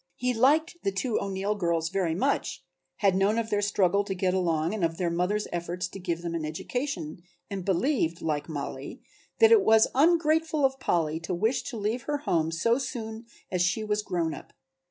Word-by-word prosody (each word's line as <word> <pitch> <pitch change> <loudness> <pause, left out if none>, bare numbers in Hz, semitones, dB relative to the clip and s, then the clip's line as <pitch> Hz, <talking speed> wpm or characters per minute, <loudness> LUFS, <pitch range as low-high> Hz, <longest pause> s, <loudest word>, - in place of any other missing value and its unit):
He 250 0 0
liked 295 +8 +3
the 195 - 0
two 215 +4 -1
O'Neill 195 +1 -1
girls 170 -5 0
very 175 -4 0
much, 275 +10 -1 0.3
had 195 -3 +2
known 200 +3 +2
of 230 -1 -2
their 205 -1 +2
struggle 200 -1 +2
to 195 -2 -3
get 185 0 0
along 170 -2 0
and 215 -4 -3
of 165 0 0
their 175 -2 0
mother's 180 +5 0
efforts 175 +1 -3
to 195 - -9
give 170 -2 -3
them 170 -1 -3
an 165 -2 -2
education, 170 - -4 0.3
and 195 -2 -3
believed, 190 - +1
like 150 0 -2
Mollie, 145 - -6 0.3
that 450 0 +6
it 450 -2 +8
was 220 - +5
ungrateful 315 0 +3
of 265 0 0
Polly 160 -9 0
to 170 +2 -3
wish 220 +8 +1
to 240 - -5
leave 215 +4 -1
her 290 - +1
home 165 - 0
so 230 +10 +2
soon 225 -3 -5 0.2
as 180 -2 0
she 185 +5 +1
was 210 0 0
grown 175 -5 -1
up. 145 - -11
195 Hz, 195 wpm, -27 LUFS, 170-235 Hz, 0.3 s, it